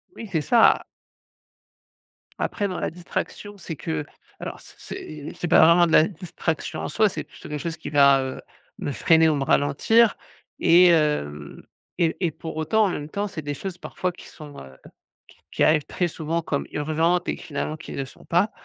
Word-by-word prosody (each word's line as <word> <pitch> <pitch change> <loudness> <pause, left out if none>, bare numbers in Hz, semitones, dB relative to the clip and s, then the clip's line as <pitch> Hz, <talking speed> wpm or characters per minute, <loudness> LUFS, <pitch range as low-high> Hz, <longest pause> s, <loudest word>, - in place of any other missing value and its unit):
Oui, 225 - -8
c'est 160 - +1
ça. 230 +8 +5 1.6
Après 205 - -1
dans 185 - -4
la - - -1
distraction, 180 +4 -6
c'est 170 -3 -7
que 80 - -4 0.3
alors - - -6
c - - -16
c'est 150 -1 -8
c'est 175 - -4
pas 165 - +5
vraiment 170 +1 +6
de - - -3
la 155 0 +6
distraction 170 -3 -4
en - - -3
soi, 215 -1 +2
c'est - - -5
plutôt - - -13
quelque 150 0 -4
chose 165 -1 -4
qui 160 - -7
va, 140 -2 +5
heu, 130 0 -6 0.4
me - - -3
freiner 160 +3 +4
ou 155 - +2
me 140 - -1
ralentir 175 +13 +3 0.4
et 180 +2 +6
hem, 110 - 0 0.4
et 170 -2 +1
et 165 - 0
pour 160 +2 -8
autant 215 +7 +2
en - - +1
même 150 -4 -5
temps, 205 +5 -2
c'est 195 -5 -6
des 145 -1 -4
choses 180 +5 -6
parfois 180 0 -3
qui 175 - -14
sont, 150 -2 -12
heu, 65 -1 -13 0.5
qui - - -21
qui - - +1
arrivent 155 -2 +3
très 175 - -1
souvent 165 +1 -3
comme 145 -3 -2
urgentes 160 +4 0
et - - -1
finalement 155 +1 -5
qui - - -9
le 135 - -3
sont - - -16
pas 180 +5 +2
160 Hz, 195 wpm, -24 LUFS, 145-180 Hz, 1.6 s, vraiment